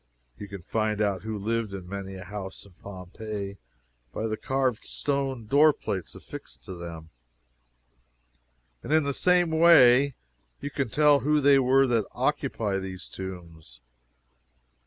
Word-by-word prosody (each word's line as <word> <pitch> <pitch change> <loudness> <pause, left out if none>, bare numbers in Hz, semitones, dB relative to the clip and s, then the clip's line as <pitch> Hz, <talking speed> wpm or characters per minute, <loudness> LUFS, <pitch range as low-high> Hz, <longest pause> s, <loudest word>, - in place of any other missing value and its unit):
You 100 - -7
can 100 -3 -9
find 110 +2 -1
out 100 -3 0
who 110 0 -4
lived 110 0 -2
in 90 -2 -8
many 95 0 -6
a 95 - -8
house 95 0 -7
in 100 - -17
Pompeii 100 +1 -7 0.5
by 110 - -3
the 110 -1 -1
carved 130 -1 -1
stone 135 -4 -2
door 145 +7 +5
plates 95 -8 -5
affixed - - -11
to 95 - -8
them: 85 -2 -9 1.7
and - - -7
in 155 0 +4
the 140 0 -1
same 180 +1 +3
way 140 -5 +6 0.4
you 145 - -5
can 135 -3 -2
tell 150 +2 +4
who 150 +2 +2
they 140 -1 +5
were 135 +1 +4
that 115 -5 +1
occupy 100 -3 -1
the 95 -1 -6
tombs. 85 -8 -9
110 Hz, 145 wpm, -27 LUFS, 95-135 Hz, 1.7 s, way